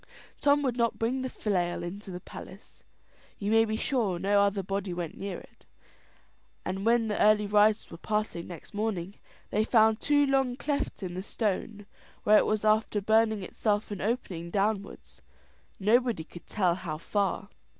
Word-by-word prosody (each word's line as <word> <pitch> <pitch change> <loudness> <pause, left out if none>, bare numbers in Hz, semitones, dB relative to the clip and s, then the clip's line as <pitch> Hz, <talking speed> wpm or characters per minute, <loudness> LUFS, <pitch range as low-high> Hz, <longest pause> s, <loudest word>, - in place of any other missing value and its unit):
Tom 290 0 +3
would 255 -3 0
not 235 -1 +1
bring 245 +4 0
the 260 - -3
flail 180 -8 -1
into 195 +4 -7
the 180 -1 -5
palace. - - -12 0.6
You 205 +1 -2
may 225 0 +5
be 220 0 -2
sure 220 -6 0
no 200 +3 +3
other 200 -1 +1
body 195 -1 -3
went 175 -3 -4
near 195 -2 -5
it; - - -16 1.0
and 190 +3 -2
when 230 -1 +3
the 210 - -1
early 210 0 +5
risers 210 +1 +3
were 165 - -9
passing 210 -5 -2
next 175 +1 -10
morning, 205 -3 -3 0.3
they 215 - +2
found 220 -1 +4
two 290 0 +3
long 270 -2 +1
clefts 280 -6 -3
in 180 -2 -4
the 185 - -4
stone, 205 0 -3 0.4
where 210 0 +6
it - - +1
was 215 0 0
after 215 0 +2
burning 220 0 +2
itself 210 +3 -1
an 200 - -4
opening 190 -7 -2
downwards, 195 - -2 0.6
nobody 230 -2 +2
could 170 +1 -13
tell 185 -5 +2
how 170 -4 -5
far. 200 +3 -1
210 Hz, 170 wpm, -29 LUFS, 190-225 Hz, 1.0 s, where